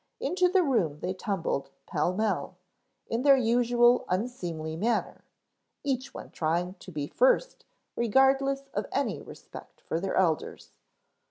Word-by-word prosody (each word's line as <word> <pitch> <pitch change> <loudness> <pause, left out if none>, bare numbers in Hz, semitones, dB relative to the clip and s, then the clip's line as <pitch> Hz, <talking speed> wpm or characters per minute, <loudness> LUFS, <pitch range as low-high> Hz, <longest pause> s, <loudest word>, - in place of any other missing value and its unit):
Into 365 0 +2
the 370 0 +3
room 210 - +1
they 180 +1 -2
tumbled 175 -8 -2 0.2
pell - - 0
mell, 195 -2 -1 0.5
in 230 +1 -1
their 275 0 +6
usual 240 0 +3
unseemly 180 -7 -3
manner, 220 +6 -1 0.6
each 270 -2 -2
one - - -10
trying 175 +3 -1
to 185 - -11
be 150 -3 -3
first - - +1 0.3
regardless 270 +3 +2
of - - -2
any - - -1
respect - - -12
for 165 - -3
their 195 +2 -2
elders. 165 -5 -1
225 Hz, 135 wpm, -28 LUFS, 180-270 Hz, 0.6 s, their